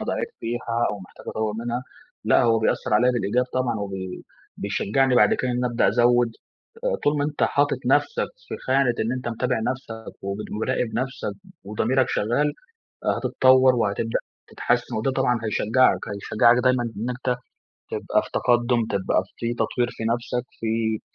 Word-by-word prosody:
أنا - - -5
ضعيف 470 -2 -1
فيها 120 0 -1
أو 105 - -5
محتاج 90 - -14
أطوّر 110 -1 -1
منها. 120 +2 -3 0.4
لأ، - - +4
هو 115 -1 +4
بيأثر 110 -1 0
عليّا 125 +4 +5
بالإيجاب 120 +1 +1
طبعًا، 130 -3 0
وبي 95 -2 -5 0.3
بيشجعني 130 +4 +1
بعد - - +5
كده 130 - -1
إن 125 0 -1
أبدأ 120 -1 +2
أزوّد، 120 0 +3 0.5
آآ - - +1
طول 145 0 +2
ما 145 - +1
أنت 150 0 -1
حاطط 145 0 +2
نفْسك 460 - +2 0.2
في - - -4
خانة 130 -2 +3
إن 115 +2 0
أنت 125 -1 -3
متابع 120 +1 -1
نفْسك 115 -4 -8
ومراقب 105 +4 -2
نفْسك 130 +2 -3 0.3
وضميرك 120 +5 +1
شغّال، 135 +8 +1 0.5
آآ - - +3
هتتطوّر 130 0 +4
وهتبدأ 115 0 0 0.3
تتحسّن 120 0 -1
وده 120 +5 0
طبعًا 125 -3 +1
هيشجّعك، 110 +4 +3
هيشجّعك 110 +3 +3
دايمًا 125 -1 +3
إنّ 115 +1 -4
أنت 125 0 -2 0.5
تبقى - - 0
في - - -11
تقدّم، 120 -1 +2
تبقى 95 -2 +1 0.2
في 120 0 -2
تطوير 120 0 0
في 110 - -7
نفْسك، 120 +1 -1 0.2
في 110 -1 0
120 Hz, 160 wpm, -24 LUFS, 110-130 Hz, 0.5 s, عليّا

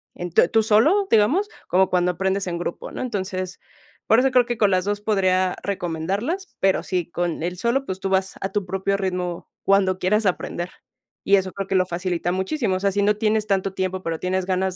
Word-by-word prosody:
en 175 0 -5
tú 170 - +5
tú 225 - +3
solo, 300 - +4
digamos, 290 - +3 0.2
como 190 +1 +3
cuando 180 0 +2
aprendes 190 +2 -1
en 170 -1 -2
grupo, 175 - -5
¿no? - - -6
Entonces, 190 -6 -4 0.5
por 225 - +5
eso 265 +1 +3
creo 250 -1 +4
que 240 -1 -3
con 205 -2 +4
las 185 0 +1
2 205 0 -1
podría 185 -3 +1
recomendarlas, 200 - -3
pero 195 0 +2
sí, 180 -3 -2
con 175 -2 -2
el 180 +1 -3
solo, 245 +7 0
pues, 190 0 -5
tú 195 - -2
vas 190 0 0
a 195 - -2
tu 205 -1 -1
propio 195 +2 -1
ritmo, 180 -3 -3
cuando 195 -1 +3
quieras 210 +4 +1
aprender, 175 -1 -2 0.5
y 200 - +5
eso 190 0 -2
creo 195 -1 -4
que 195 - -1
lo 185 -1 +4
facilita 175 0 -2
muchísimo, 190 +3 -1
o - - -5
sea, 200 0 +2
si 200 +1 0
no 210 +1 +2
tienes 215 0 +1
tanto 195 -1 0
tiempo, 185 0 -2
pero 165 -1 -3
tienes 185 0 -1
ganas 185 0 0
190 Hz, 215 wpm, -23 LUFS, 185-210 Hz, 0.5 s, tú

